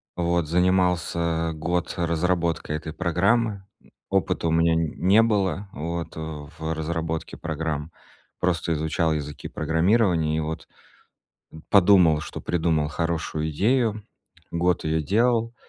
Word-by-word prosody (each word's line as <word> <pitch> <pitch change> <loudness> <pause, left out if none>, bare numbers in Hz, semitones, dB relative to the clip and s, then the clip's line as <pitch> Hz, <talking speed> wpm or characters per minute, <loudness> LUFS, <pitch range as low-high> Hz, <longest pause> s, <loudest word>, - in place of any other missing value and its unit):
Вот. 85 -2 0
Занимался 85 -2 +1
год 85 +2 -2
разработкой 85 -2 0
этой 80 0 -7
программы. 95 +4 +1 0.2
Э, - - -22 0.2
опыта 95 -3 0
у 80 - +1
меня 80 0 +3
н 80 -2 0
не 100 +5 +5
было, 100 -3 0
вот, 85 +2 -4
в 80 0 -5
разработке 80 0 -3
программ. 80 -1 -3 0.5
Просто 85 -2 0
изучал 80 +1 0
языки 75 -1 -5
программирования 80 0 +1
и - - +1
вот 80 +1 -4 1.0
подумал, 90 -6 +5
что - - -7
придумал 80 -3 0
хорошую 80 -1 -2
идею. 110 - +1 0.5
Год 85 +1 0
её 80 0 0
делал. 115 +5 +1
85 Hz, 120 wpm, -24 LUFS, 80-90 Hz, 1.0 s, не